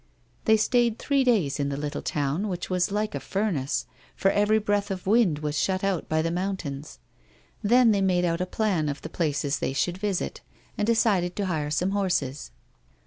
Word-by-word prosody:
They 220 -1 +5
stayed 235 +1 +2
three 280 +1 +1
days 200 - +2
in 140 0 0
the 140 - -3
little 145 0 -4
town 150 +7 -1
which 180 -1 -4
was 180 +1 +1
like 210 +1 -1
a - - -2
furnace, 190 -10 -1 0.3
for 195 - +2
every 210 +1 +3
breath 205 -1 0
of 190 -2 -4
wind 205 -6 +3
was 150 0 -2
shut 190 0 0
out 195 -4 -1
by 155 0 +1
the 165 - -1
mountains. 170 -6 -4 0.6
Then 235 +2 +5
they 200 -2 +2
made 180 -2 +2
out 170 0 0
a 180 - -1
plan 185 -7 0
of 145 - -5
the - - -5
places 145 -3 -1
they - - -1
should 175 +6 -1
visit, 200 -3 -2 0.3
and 210 - -1
decided 200 -6 +2
to 200 - -1
hire 155 -5 -1
some 180 +5 0
horses. 180 - -1
185 Hz, 195 wpm, -26 LUFS, 155-210 Hz, 0.6 s, They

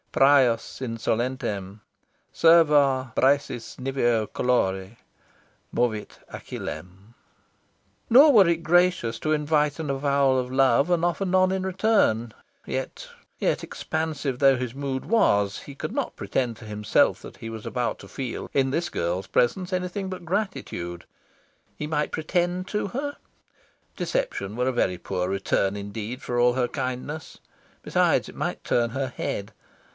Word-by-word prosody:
"Prius 135 -4 +3
insolentem 115 -4 -2 0.5
Serva 145 -6 +4
Briseis 135 -4 +1
niveo 120 -4 +1
colore 95 -4 -1 0.8
Movit 110 -4 -1
Achillem." 95 +5 -8 1.0
Nor 280 +5 +8
were 200 -6 +7
it 170 -1 +1
gracious 175 -9 +2
to 155 - -1
invite 150 -1 +1
an 155 -3 -3
avowal 140 -1 +2
of 125 0 -2
love 135 +3 +3
and 175 -1 +2
offer 175 +3 0
none 185 0 +3
in 190 0 -1
return. 185 - +2 0.3
Yet, - - -4 0.3
yet, - - 0
expansive 155 -5 -3
though 135 -2 +5
his 125 -2 -4
mood 135 -1 -3
was, 105 - +2
he 140 - -11
could - - -5
not - - -3
pretend 120 -4 -2
to - - -12
himself 105 0 +1
that - - -11
he 115 - -7
was 110 -1 -8
about 125 -1 -2
to - - -11
feel 130 -4 -5
in 135 -1 +2
this 170 +4 -1
girl's 90 - -2
presence 180 +10 +1
anything 185 +1 -2
but 180 -2 -7
gratitude. 160 - -3 0.7
He 150 - -4
might 150 -1 -1
pretend 175 +3 -1
to 210 -1 -1
her? 285 +7 -4 0.8
Deception - - -2
were 125 +1 +1
a 130 - +1
very 90 -6 +1
poor 90 +1 -3
return 100 0 0
indeed 105 +4 -6
for 120 - -3
all 120 0 +4
her 125 -1 +1
kindness. 130 +6 -5 0.4
Besides, - - +2
it - - -11
might - - -3
turn 120 -1 +2
her 135 +3 -2
head. 100 +2 -4
130 Hz, 140 wpm, -25 LUFS, 115-165 Hz, 1.0 s, Nor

